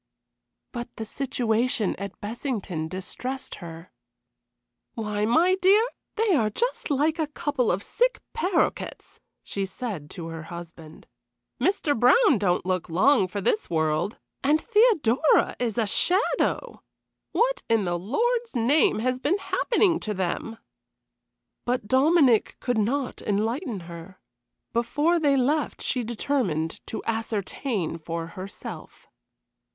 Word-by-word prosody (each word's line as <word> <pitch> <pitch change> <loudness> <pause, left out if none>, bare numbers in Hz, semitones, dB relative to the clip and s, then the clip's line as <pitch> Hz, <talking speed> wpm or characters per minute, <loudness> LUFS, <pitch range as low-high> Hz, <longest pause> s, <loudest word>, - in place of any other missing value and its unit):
But 240 0 -7
the 220 - -5
situation 240 -2 0
at 200 -1 -7
Bessington 205 - -3
distressed 250 +9 -5
her. 165 0 -9 1.0
"Why, 210 -2 -1
my 335 +10 +4
dear, 385 +4 +4 0.3
they 440 -2 +2
are 225 -9 +3
just 480 - -2
like 305 +3 +1
a 315 - +1
couple 290 -4 0
of 190 +3 -1
sick - - +1
paroquets," 375 -6 -1 0.2
she 200 - -3
said 190 - -5
to 170 - -7
her 165 -1 -6
husband. 170 -2 -10 0.6
"Mr. 350 -7 +2
Brown 260 - +5
don't 180 -3 +1
look 185 -1 -1
long 200 - +4
for 200 +2 -4
this 430 - 0
world, 160 +4 0 0.3
and 295 +3 +4
Theodora 365 - +3
is 235 -3 -1
a 230 - +2
shadow! 395 - 0 0.5
What - - +1
in 225 -3 +3
the 175 -1 -1
Lord's 460 - -1
name 255 +6 +3
has 255 +1 0
been 300 +9 +1
happening 395 -3 +1
to 210 -1 -3
them?" 190 +5 -3 1.1
But 245 -3 -1
Dominic 265 -2 +4
could 245 -3 0
not 250 +5 -1
enlighten 220 - -1
her. 170 +2 -10 0.5
Before 295 +9 +2
they 285 -3 +3
left 290 +4 +1
she 250 - -1
determined 215 - -1
to - - -5
ascertain 220 - -2
for 165 +1 -4
herself. 185 +3 -9
235 Hz, 125 wpm, -26 LUFS, 195-300 Hz, 1.1 s, Brown